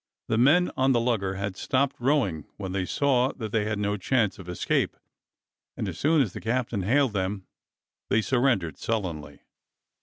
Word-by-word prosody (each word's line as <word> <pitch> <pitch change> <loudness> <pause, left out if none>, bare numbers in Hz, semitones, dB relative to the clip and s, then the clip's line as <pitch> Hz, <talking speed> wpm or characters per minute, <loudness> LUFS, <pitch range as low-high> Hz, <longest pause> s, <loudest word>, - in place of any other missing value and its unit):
The 110 - +2
men 160 +8 +4
on 130 +1 +3
the 120 - +3
lugger 110 -6 0
had 100 0 -3
stopped 135 +7 0
rowing 120 - +1
when 95 -2 -5
they 95 -1 -1
saw 130 -2 +2
that 110 -5 -6
they 110 -2 +1
had 105 -1 -1
no 105 0 -1
chance 105 0 0
of 90 -1 -9
escape, 90 - 0 0.8
and - - -2
as - - -6
soon 155 0 +4
as 105 - -5
the - - -7
captain 115 -3 -1
hailed 125 +5 +2
them 95 0 -2 0.6
they 110 - +3
surrendered 120 - +1
sullenly. 85 -10 -3
110 Hz, 175 wpm, -26 LUFS, 95-130 Hz, 0.8 s, men